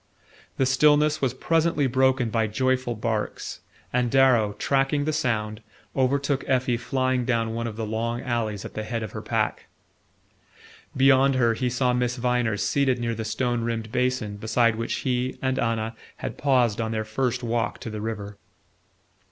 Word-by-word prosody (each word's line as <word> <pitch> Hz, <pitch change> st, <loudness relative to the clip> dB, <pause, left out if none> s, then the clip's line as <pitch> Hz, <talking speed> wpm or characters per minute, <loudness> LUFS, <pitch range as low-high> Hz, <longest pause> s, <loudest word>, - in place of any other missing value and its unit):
The 135 Hz, -, +2 dB
stillness 150 Hz, +3 st, +4 dB
was 130 Hz, -2 st, 0 dB
presently 165 Hz, 0 st, +1 dB
broken 130 Hz, -2 st, +2 dB
by 110 Hz, 0 st, +1 dB
joyful 130 Hz, +2 st, 0 dB
barks, 110 Hz, -1 st, -3 dB, 0.3 s
and 125 Hz, -1 st, +2 dB
Darrow, 125 Hz, -5 st, +4 dB
tracking 135 Hz, +5 st, +1 dB
the 155 Hz, -, 0 dB
sound, 110 Hz, -7 st, -1 dB, 0.3 s
overtook 140 Hz, +1 st, +1 dB
Effie 130 Hz, -1 st, +2 dB
flying 130 Hz, +1 st, 0 dB
down 115 Hz, -2 st, 0 dB
one 115 Hz, +1 st, -2 dB
of 110 Hz, -, -6 dB
the 110 Hz, 0 st, -3 dB
long 115 Hz, +2 st, -2 dB
alleys 115 Hz, -6 st, -2 dB
at -, -, -8 dB
the 110 Hz, -, -3 dB
head 115 Hz, +1 st, -3 dB
of 110 Hz, -, -6 dB
her -, -, -6 dB
pack. -, -, -1 dB, 1.3 s
Beyond 135 Hz, 0 st, +5 dB
her 120 Hz, -3 st, +3 dB
he 125 Hz, +2 st, -1 dB
saw 125 Hz, 0 st, +1 dB
Miss 125 Hz, 0 st, 0 dB
Viner 120 Hz, -3 st, 0 dB
seated 130 Hz, +5 st, +1 dB
near 120 Hz, -1 st, -2 dB
the 110 Hz, 0 st, -4 dB
stone 120 Hz, +2 st, -1 dB
rimmed 115 Hz, -1 st, -3 dB
basin 125 Hz, -4 st, -1 dB
beside 110 Hz, +2 st, +2 dB
which 115 Hz, +1 st, -2 dB
he 125 Hz, 0 st, -1 dB
and 130 Hz, 0 st, -1 dB
Anna 115 Hz, -1 st, -1 dB, 0.2 s
had -, -, -5 dB
paused 125 Hz, -6 st, +2 dB
on 110 Hz, 0 st, -2 dB
their 110 Hz, -1 st, -2 dB
first 125 Hz, +3 st, -1 dB
walk 115 Hz, -2 st, -1 dB
to 110 Hz, -, -6 dB
the 105 Hz, -1 st, -5 dB
river. 105 Hz, -2 st, -5 dB
120 Hz, 170 wpm, -25 LUFS, 110-130 Hz, 1.3 s, Beyond